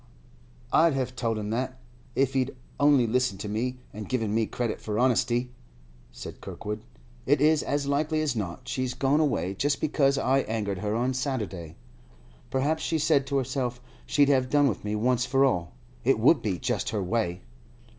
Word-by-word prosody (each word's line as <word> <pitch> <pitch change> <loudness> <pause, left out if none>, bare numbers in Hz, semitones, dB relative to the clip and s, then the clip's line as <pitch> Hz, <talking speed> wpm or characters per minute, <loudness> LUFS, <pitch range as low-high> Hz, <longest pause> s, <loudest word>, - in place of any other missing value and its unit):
'I'd 165 -1 +5
have 130 -1 -2
told 115 -3 -1
him 105 0 -3
that, 130 +3 -2 0.4
if 135 0 +2
he'd 130 0 0 0.2
only 145 -3 +5
listened 125 -3 0
to - - -4
me 120 +5 -2 0.2
and 105 0 -7
given 115 -5 0
me 110 -1 +1
credit 120 -3 -3
for 105 -1 -3
honesty,' 125 0 +2 0.6
said - - -9
Kirkwood. 105 +1 -6 0.4
'It 145 +1 +4
is 155 +1 +4
as 145 0 -1
likely 150 +3 0
as 145 -5 0
not 95 -6 -4
she's 130 -1 -2
gone 140 +2 +2
away 130 - +1
just 140 +9 0
because 140 -2 +2
I 135 0 +2
angered 105 -6 -2
her 105 +2 -1
on 125 +3 +1
Saturday. 105 - -3 0.7
Perhaps 145 +4 0
she 160 - 0
said 150 -3 +2
to 140 0 0
herself 125 -2 -2 0.3
she'd 145 -1 +4
have 130 -2 +3
done 145 0 +4
with 115 - -2
me 105 0 -2
once 125 +3 +1
for 135 +2 +4
all. 90 -10 0 0.3
It 135 0 +3
would 125 +5 +4
be 100 -5 -1
just - - -1
her 105 -3 -1
way. 90 -3 -1
125 Hz, 180 wpm, -27 LUFS, 110-140 Hz, 0.7 s, I'd